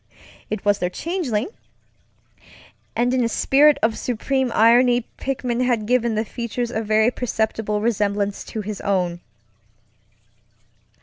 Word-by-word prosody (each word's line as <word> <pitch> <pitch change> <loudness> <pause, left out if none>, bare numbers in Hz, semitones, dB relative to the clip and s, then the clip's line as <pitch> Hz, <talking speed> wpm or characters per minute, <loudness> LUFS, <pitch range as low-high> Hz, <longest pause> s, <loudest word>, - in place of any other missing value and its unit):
It 215 -2 -4
was 205 0 +3
their 180 - -1
changelingŌĆöand 315 - -2 1.4
in 245 +1 +1
a 230 - 0
spirit 285 +5 +4
of 220 0 +2
supreme 255 +2 -1
irony 240 +2 +4
Pickman 255 -2 -2
had 240 -4 0
given 235 -1 +1
the 220 +1 0
features 235 +1 -4
a 220 - -2
very 220 +2 +2
perceptible 220 -3 -2
resemblance 205 -2 -1
to 220 - -5
his 210 0 -6
own. 180 -4 0
230 Hz, 120 wpm, -22 LUFS, 210-250 Hz, 1.4 s, spirit